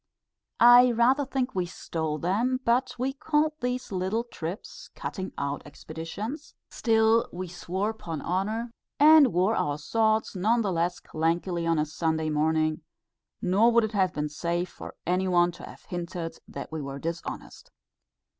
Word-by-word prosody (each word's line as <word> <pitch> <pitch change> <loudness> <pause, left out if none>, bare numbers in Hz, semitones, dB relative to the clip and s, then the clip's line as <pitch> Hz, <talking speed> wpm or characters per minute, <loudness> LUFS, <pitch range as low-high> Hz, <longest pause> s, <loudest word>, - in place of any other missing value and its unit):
I 245 +1 +8
rather 250 +5 +3
think 260 -1 -2
we 180 -2 -1
stole 160 -3 -3
them; 225 - 0
but 250 +2 +1
we 260 +2 -1
called 305 +1 +1
these 250 -1 -2
little 190 +5 -1
trips, 180 -5 -7
"cutting 190 -1 -5
out 140 0 -2
expeditions;" 165 - -7 0.2
still 225 0 +3
we 185 +1 -5
swore 185 +4 -3
"'pon 165 -8 -6
honour," 215 +8 -2 0.3
and 300 -3 +8
wore 185 +6 +2
our 145 0 0
swords 220 +8 +1
none 220 +6 +2
the 200 - 0
less 175 +1 0
clankingly 170 +2 -1
on 165 - +2
a 150 - +2
Sunday 160 0 -1
morning; 155 +1 +1 0.6
nor 200 +6 +4
would 235 0 +4
it 220 - -1
have 190 -4 +2
been 150 -3 -2
safe 170 +4 -2
for - - -10
any 185 +2 +1
one 175 -1 +3
to 175 - -13
have - - -13
hinted 175 -1 -5
that - - -8
we 160 -1 -4
were 140 0 -6
dishonest. 165 - -6
185 Hz, 155 wpm, -27 LUFS, 165-235 Hz, 0.6 s, I